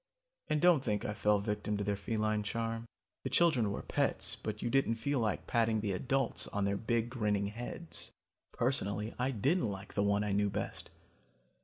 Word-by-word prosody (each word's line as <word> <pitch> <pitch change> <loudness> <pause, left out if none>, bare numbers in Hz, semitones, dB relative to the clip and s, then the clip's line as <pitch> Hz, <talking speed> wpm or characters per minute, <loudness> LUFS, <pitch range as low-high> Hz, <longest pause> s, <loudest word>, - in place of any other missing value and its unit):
"And 150 - +1
don't 170 -4 +5
think 105 -4 -1
I 105 - -1
fell 105 0 +3
victim 105 0 -2
to 100 - -1
their 100 0 0
feline 110 0 0
charm. 115 +2 -3 0.4
The - - -2
children 135 -12 +3
were 100 - -4
pets, - - 0
but - - -5
you 120 - 0
didn't 135 -4 +3
feel 140 +4 0
like 110 -2 0
patting 115 -2 +2
the 105 -2 -1
adults 130 +6 0
on 100 -1 -1
their 100 0 +1
big 115 +2 0
grinning 105 -5 +1
heads. 120 +10 -6 0.4
Personally 110 -4 0
I 125 +2 +2
didn't 135 - +1
like 100 0 -7
the 100 - +1
one 100 0 +2
I 105 - -1
knew 100 +1 +2
best. 100 +1 -4
110 Hz, 185 wpm, -33 LUFS, 105-120 Hz, 0.4 s, don't